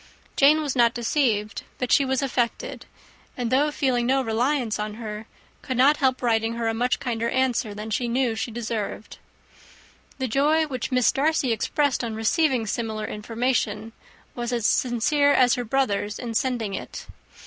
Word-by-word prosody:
Jane 300 +3 +5
was 285 -3 -2
not 235 -2 +3
deceived, 230 -4 0 0.2
but 250 - -3
she 275 - +5
was 265 +1 0
affected; 240 -3 -2 0.5
and 245 -2 -2
though 285 +4 +3
feeling 255 -5 0
no 265 +1 +2
reliance 240 0 0
on 210 0 -4
her, 215 -1 -7 0.3
could 255 -3 -4
not 280 +4 +5
help 260 -2 +1
writing 225 -1 +1
her 230 -1 -2
a 225 - 0
much 245 +3 0
kinder 235 -2 -2
answer 250 -5 0
than 215 +1 -6
she 240 +3 0
knew 245 +1 +1
was 220 0 -3
deserved. 225 -2 -5 1.0
The 260 - -2
joy 295 +6 +2
which 260 -3 -4
Miss 250 -2 +3
Darcy 290 -2 +1
expressed 265 +5 0
on 225 -2 -3
receiving 250 +2 +1
similar 220 0 -3
information 225 0 -2 0.4
was 240 0 -4
as 235 -3 -1
sincere 285 +6 +2
as 250 -2 +4
her 250 -2 -1
brother's 215 -4 -1
in 235 -2 -5
sending 230 -4 -1
it. - - -7
240 Hz, 165 wpm, -24 LUFS, 225-265 Hz, 1.0 s, Jane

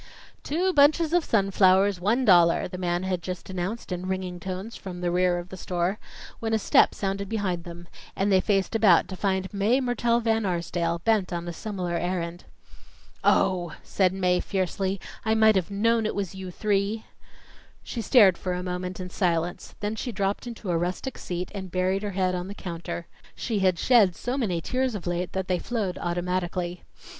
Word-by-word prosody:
"Two 360 +6 0
bunches 305 +2 +4
of 350 -1 +4
sunflowers, 195 -3 +3
one 230 +7 +2
dollar," 175 -4 +5
the 180 - -7
man 175 0 -1
had 185 -2 -1
just 185 +1 -6
announced 190 +5 -4
in 180 +1 -3
ringing 185 -1 -3
tones 190 +5 -5
from 180 -2 -7
the 175 -1 -1
rear 180 0 +2
of 175 +1 -6
the 190 - -8
store, 180 +3 -1 0.4
when 225 -1 -2
a - - +3
step 215 - +4
sounded 195 0 -3
behind 185 -6 -2
them, 175 0 -9 0.3
and 200 +1 +1
they 190 -1 +5
faced 195 0 +1
about 205 -6 +5
to 190 - -6
find 190 0 -1
Mae 210 +6 +2
Mertelle 240 -2 +1
Van 225 -1 +1
Arsdale, 170 -2 -1
bent 215 -5 +2
on 175 0 -3
a 170 - -4
similar 185 -2 -4
errand. 175 0 -3 0.8
"Oh!" 175 -3 +2
said 185 -2 +2
Mae, 180 -1 +1
fiercely, 190 0 -1 0.2
"I 220 0 +2
might 220 -1 +5
have 185 -1 0
known 225 +2 +2
it - - -3
was 200 -3 -3
you 190 -1 -7
three." 205 +3 -1 0.8
She 235 - -4
stared 205 -5 +5
for 185 - -2
a 180 0 -3
moment 180 0 -4
in 180 -1 -6
silence, 175 -2 -1
then 210 +1 -2
she 245 +3 -4
dropped 200 +2 -2
into 225 -5 -5
a 170 - +2
rustic 180 +9 -3
seat 180 0 -4
and 190 -2 -6
buried 185 +2 0
her 210 - -3
head 185 -1 +2
on 180 0 -3
the 200 - -7
counter. 170 -2 -6 0.3
She 220 -4 -2
had 185 -2 +2
shed 205 -3 +4
so 245 +8 -3
many 195 -11 -1
tears 255 +4 -1
of 200 - -6
late 175 0 -2
that 190 -1 -2
they 180 -1 +1
flowed 210 -7 -3
automatically. 175 0 -2
190 Hz, 190 wpm, -26 LUFS, 180-210 Hz, 0.8 s, dollar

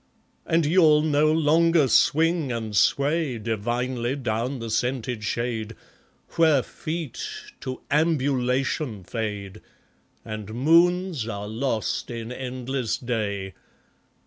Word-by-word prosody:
And 165 -1 +2
you'll 155 -2 +5
no 155 0 +3
longer 160 0 +4
swing 160 +3 +3
and 110 -3 -4
sway 140 +3 +2
Divinely 120 +3 -2
down 120 0 -2
the 115 -2 -5
scented 125 -2 -1
shade, 115 0 -2 0.5
Where 155 -6 +3
feet 160 -5 -5 0.4
to 130 0 -6
Ambulation 135 - 0
fade, 105 -1 -5 0.6
And 110 0 -6
moons 170 0 +3
are 100 -2 -5
lost 115 0 -2
in 115 -1 -6
endless 130 -1 -3
Day. 100 -6 -3
125 Hz, 100 wpm, -25 LUFS, 115-155 Hz, 0.6 s, you'll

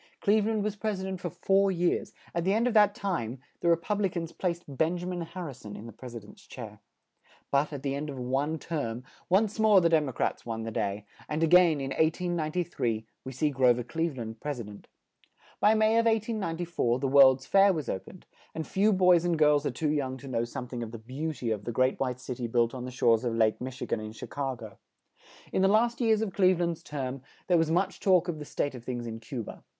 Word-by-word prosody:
Cleve 210 +1 +3
land 220 -2 0
was 210 -1 -2
pres 210 -2 -2
i - - -5
dent 190 -1 -4
for 175 - -3
four 195 +4 +2
years; 175 -1 0 0.2
at 170 - -1
the 190 +3 +2
end 230 +2 +2
of 250 - +1
that 210 -2 +5
time, 135 - -2 0.2
the 170 - +1
Re 170 - +6
pub 205 +5 -2
li 195 - +2
cans 170 -2 -4
placed 175 -2 -2
Ben 160 +5 0
ja 175 - -6
min 180 -1 -3
Har 170 +2 -6
ri 145 - -6
son 105 -4 -10
in 105 - -9
the 115 - -8
pres 120 +2 -10
i - - -3
dent's 105 -2 -14
chair. - - -9 0.7
But, 140 +2 +2
at 140 -2 -6
the 135 -1 -1
end 145 +2 -4
of 140 - -6
one 135 +5 -1
term, 130 -7 -4 0.3
once 210 +4 +2
more 215 -2 +6
the 170 -2 +3
Dem 155 -4 +3
o - - -4
crats - - -2
won 115 -1 -4
the 115 - -4
day; 100 -1 -2 0.2
and 155 +2 0
a - - +6
gain, 170 -2 +5
in 135 0 -4
1893, 160 -7 -1 0.2
we 130 - -6
see 145 +3 0
Gro 130 -2 +4
ver 120 - -3
Cleve 160 +2 -2
land 110 -1 -6
pres 145 -3 -4
i - - -4
dent. 105 -1 -12 0.7
In 215 +2 +5
May 220 +1 +4
of 230 - +2
1894, 175 - 0
the 135 +1 -1
World's 130 -1 +6
Fair 195 0 +5
was 155 -8 -3
o 95 - -1
pened; - - -14 0.3
and 160 - -3
few 205 +3 +2
boys 180 -3 +5
and 175 -2 +1
girls 150 -1 +4
are - - +1
too 150 +4 -1
young 135 -3 -1
to 135 - -11
know 120 -3 -1
some 125 +1 -6
thing 120 -1 -5
of 115 -1 -5
the 115 - -7
beau 130 +8 -4
ty 125 -5 -4
of 105 -1 -6
the 120 - -2
Great 130 +3 +1
White 125 -2 -1
Cit 125 -1 -6
y 120 - -2
built 115 0 +1
on 125 -1 -5
the - - -5
shores 115 -2 +3
of 120 -2 -1
Lake 110 -1 +2
Mich 130 0 -5
i - - -2
gan - - -1
in 110 0 -7
Chi - - -8
ca 135 -2 -3
go. 110 -5 -11 0.7
In - - +2
the 190 - +5
last 235 +4 +2
years 220 -2 +3
of 200 -4 -4
Cleve 185 -3 +3
land's 170 -1 -1
term, 135 -4 -5 0.2
there 175 -2 +3
was 160 -1 +1
much 185 +4 0
talk 185 -3 +3
of 165 -3 -3
the 150 - -7
state 145 0 -2
of 125 -2 -9
things 120 -1 -4
in 115 -1 -6
Cu 115 +1 -5
ba. - - -10
150 Hz, 260 wpm, -28 LUFS, 125-180 Hz, 0.7 s, Re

